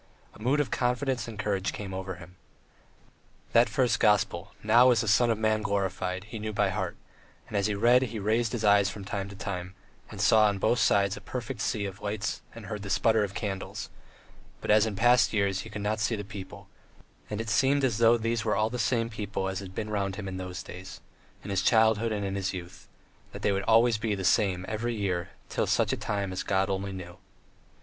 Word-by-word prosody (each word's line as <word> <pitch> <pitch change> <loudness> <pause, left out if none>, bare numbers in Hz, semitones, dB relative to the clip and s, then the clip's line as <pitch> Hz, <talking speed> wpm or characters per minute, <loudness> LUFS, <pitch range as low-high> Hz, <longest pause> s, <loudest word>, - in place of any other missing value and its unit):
A - - -16
mood 130 +6 +2
of 145 - 0
confidence 125 +1 0
and 115 -2 -8
courage 100 -2 -1
came 100 -2 -6
over 95 0 -4
him. 90 +1 -13 1.2
That 115 +1 +5
first 125 -3 +1
gospel, 100 -2 +1
"Now 120 +4 +6
is 120 -2 +4
the 115 - -3
Son 120 +3 +4
of 115 - +1
Man 110 0 +1
glorified," 95 -2 -2
he 110 +2 -8
knew 110 +1 -3
by 105 -1 +1
heart; 95 -2 -3 0.5
and 110 - -8
as 100 0 +2
he 105 - -1
read 120 +5 +5
he 120 -3 -3
raised 110 +3 +1
his 120 -3 -3
eyes 100 -1 +5
from 100 0 -8
time 100 -1 -4
to 100 - -10
time, 95 -2 -5 0.3
and - - -9
saw 110 -1 +5
on 100 -1 0
both 120 +5 +2
sides 100 +1 +3
a - - -9
perfect 120 -2 -5
sea 105 -3 -1
of 95 +1 -7
lights 105 0 -3
and - - -9
heard 105 -1 -5
the 100 - -7
splutter 110 +2 +3
of 100 -1 -4
candles, 95 -2 -4 0.7
but, - - -1
as 110 +1 +5
in 105 - -3
past 120 +4 +4
years, 100 -3 +1
he - - -7
could 105 -1 -6
not 110 +1 0
see 110 +2 +1
the 105 - -5
people, 100 -2 -9 0.6
and 105 - -3
it 115 - -4
seemed 135 +5 +2
as 120 -4 +1
though 115 0 +6
these 115 0 -1
were 110 -1 +1
all 110 +2 +1
the 125 - -4
same 115 0 +1
people 105 -3 -4
as 95 0 -3
had 95 -1 -9
been 105 -1 -4
round 100 -2 -1
him 100 -1 -6
in 95 -1 -5
those 95 0 -6
days, 90 +1 -9 0.4
in 100 - -6
his 95 -1 +1
childhood 110 0 +3
and 100 -2 -2
his 95 -1 -2
youth; 90 0 -9 0.5
that - - -8
they - - +3
would 100 0 -1
always 115 0 +4
be 110 -2 -1
the 95 -1 -4
same 95 -2 +2
every 115 +2 -2
year 95 -4 0
and 85 - -9 0.2
till - - -1
such - - +2
time 100 -2 -2
as 95 - -2
God 95 0 0
only 95 +1 -2
knew. 90 -2 -8
105 Hz, 225 wpm, -28 LUFS, 95-115 Hz, 1.2 s, Now